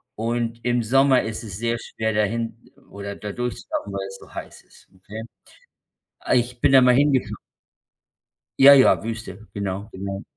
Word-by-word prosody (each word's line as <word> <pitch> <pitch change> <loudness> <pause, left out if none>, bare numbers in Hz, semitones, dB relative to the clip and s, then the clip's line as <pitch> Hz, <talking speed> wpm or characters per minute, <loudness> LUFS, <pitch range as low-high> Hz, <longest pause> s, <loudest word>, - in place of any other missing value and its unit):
und 115 +1 -3
im 120 -1 +1
Sommer 135 +3 +4
ist 110 +2 -5
es 100 -4 -7
sehr 115 +2 -1
schwer, 110 0 -3
dahin 115 +2 -1 0.3
oder 100 0 -7
da 105 -1 -6
durchzulaufen, 120 -4 -4
weil's 95 0 -5
so - - -16
heiß - - -9
ist, - - -22
okay? 105 +4 -9 1.0
Ah, - - -1
ich 125 0 0
bin - - +3
da 135 -1 +7
mal 125 -1 +5
hingefahren. 140 -2 +2 1.2
Ja, 140 +1 +10
ja, 135 -2 +5
Wüste, 110 -2 -7
genau, 100 0 -4
genau. 95 +1 -6
115 Hz, 155 wpm, -23 LUFS, 100-125 Hz, 1.2 s, Ja